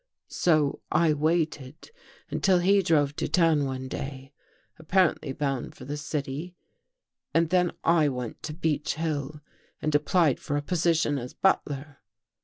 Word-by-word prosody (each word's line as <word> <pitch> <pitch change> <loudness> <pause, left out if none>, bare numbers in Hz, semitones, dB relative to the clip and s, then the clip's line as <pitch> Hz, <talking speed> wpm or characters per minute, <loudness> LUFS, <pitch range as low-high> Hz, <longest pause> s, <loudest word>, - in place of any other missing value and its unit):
" - - -63 0.2
So 155 -5 +3
I 165 -2 +3
waited 155 - -1 0.4
until 190 -2 +3
he 195 +3 +4
drove 150 -5 +2
to - - -1
town 165 -5 +3
one 130 -1 -4
day, 135 +1 -7 0.5
apparently 160 -3 +1
bound 135 -2 -3
for - - -11
the 145 +2 -4
city 150 +3 -4 0.8
and 165 0 +2
then 180 -1 +2
I 165 -3 +4
went 125 -3 -5
to 150 - -5
Beech 155 -3 -1
Hill 150 -2 -3 0.4
and 155 - -2
applied 150 -1 +3
for 145 - -2
a - - -1
position 160 -4 +1
as 125 0 -8
butler. 145 -6 0
150 Hz, 145 wpm, -27 LUFS, 140-165 Hz, 0.8 s, he